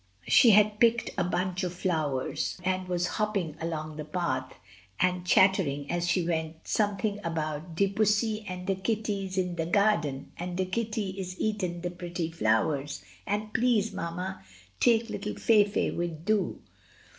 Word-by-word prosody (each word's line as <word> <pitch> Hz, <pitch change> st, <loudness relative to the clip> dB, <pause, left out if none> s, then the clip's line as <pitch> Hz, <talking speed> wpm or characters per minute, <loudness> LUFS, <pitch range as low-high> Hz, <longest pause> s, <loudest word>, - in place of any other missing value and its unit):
She 240 Hz, -, +7 dB
had 210 Hz, 0 st, +5 dB
picked 230 Hz, -1 st, +3 dB
a -, -, +1 dB
bunch 180 Hz, +1 st, -1 dB
of 180 Hz, -1 st, -3 dB
flowers, 155 Hz, -8 st, -1 dB
and 185 Hz, 0 st, -1 dB
was 175 Hz, -1 st, 0 dB
hopping 200 Hz, -6 st, -1 dB
along 155 Hz, -2 st, -4 dB
the 155 Hz, -, -4 dB
path, 150 Hz, -5 st, -2 dB, 0.4 s
and 180 Hz, 0 st, +1 dB
chattering 160 Hz, -9 st, +3 dB
as 175 Hz, 0 st, 0 dB
she 175 Hz, -1 st, +1 dB
went 160 Hz, -1 st, -3 dB
something 205 Hz, 0 st, 0 dB
about 160 Hz, 0 st, -3 dB
"De 200 Hz, +4 st, +3 dB
pussy 215 Hz, +2 st, +1 dB
and 180 Hz, 0 st, -5 dB
de 195 Hz, -, +1 dB
kitty 200 Hz, 0 st, -2 dB
is 190 Hz, 0 st, -7 dB
in 180 Hz, -1 st, 0 dB
de 165 Hz, -1 st, -2 dB
darden, 170 Hz, -8 st, +1 dB
and 175 Hz, +1 st, -4 dB
de 185 Hz, -, +1 dB
kitty 215 Hz, 0 st, -2 dB
is 185 Hz, -1 st, -6 dB
eaten 185 Hz, -5 st, -1 dB
de 175 Hz, 0 st, -3 dB
petty 175 Hz, -2 st, -4 dB
flowers, 140 Hz, +2 st, 0 dB, 0.2 s
and 210 Hz, +1 st, -2 dB
please, 230 Hz, -3 st, +2 dB
mamma, 170 Hz, -, -4 dB, 0.4 s
take 230 Hz, -1 st, +4 dB
'ittle 210 Hz, -, -4 dB
Fayfay 210 Hz, -2 st, +3 dB
wid 170 Hz, -2 st, -3 dB
dou." 215 Hz, -1 st, +1 dB
180 Hz, 155 wpm, -28 LUFS, 165-205 Hz, 0.4 s, She